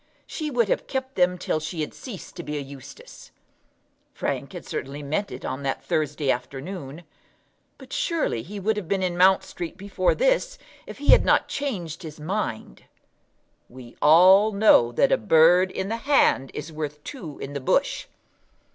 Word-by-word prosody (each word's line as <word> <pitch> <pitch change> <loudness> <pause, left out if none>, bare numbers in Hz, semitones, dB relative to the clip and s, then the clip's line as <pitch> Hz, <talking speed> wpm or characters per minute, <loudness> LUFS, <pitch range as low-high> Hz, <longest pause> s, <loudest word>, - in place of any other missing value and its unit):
She 310 -2 -4
would 240 -5 +1
have - - -1
kept 265 0 -4
them 180 -3 +2
till 160 - -1
she 160 +1 -5
had 150 - -4
ceased 225 -9 -10
to - - -4
be 150 -3 -5
a - - -2
Eustace. 135 -1 -11 0.9
Frank - - -3
had - - -8
certainly 140 +2 -5
meant 160 +8 -2
it 125 - -8
on 130 +2 -4
that 135 -1 -3
Thursday 150 -2 0
afternoon; 140 +5 -6 0.7
but - - -12
surely 320 - -1
he 200 - -8
would 210 +2 0
have 200 -5 -4
been 195 0 0
in 180 -1 -1
Mount 185 +2 +5
Street 175 -1 -7
before 190 -2 0
this - - +1 0.3
if - - -9
he 285 - -5
had - - +8
not - - +3
changed 190 - -4
his 155 -3 -9
mind. 155 - -4 0.8
We 120 -1 -13
all 185 +7 +7
know 200 - +5
that 120 - +2
a - - +4
bird 165 - +5
in 190 +1 -4
the 225 - -2
hand 230 - +2
is 155 +2 -6
worth 150 -1 -5
two 170 - -8
in 140 - -7
the 140 - -4
bush. 130 - 0
175 Hz, 175 wpm, -24 LUFS, 145-205 Hz, 0.9 s, had